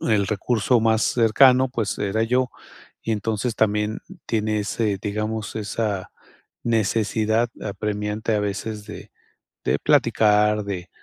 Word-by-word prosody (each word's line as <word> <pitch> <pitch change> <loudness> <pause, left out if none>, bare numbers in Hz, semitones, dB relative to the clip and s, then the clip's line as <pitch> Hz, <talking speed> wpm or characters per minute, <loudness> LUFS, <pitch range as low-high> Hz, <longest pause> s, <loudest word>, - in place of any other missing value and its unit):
el 105 -4 +1
recurso 115 +3 +1
más 110 0 +2
cercano, 125 +3 +4
pues, 115 -5 -3
era 105 +2 0
yo, 125 +2 +1 0.5
y 115 - -3
entonces 110 +2 -2
también 105 0 +1 0.3
tiene 110 -1 0
ese, 105 -1 -1
digamos, 110 +1 -3
esa 105 -2 -2 0.5
necesidad 110 0 +1
apremiante, 105 +1 -2
a 105 - +1
veces, 105 +1 -4
de 105 - -10 0.6
de - - +1
platicar, 105 0 +3
de 90 -3 -5
110 Hz, 120 wpm, -23 LUFS, 105-115 Hz, 0.6 s, cercano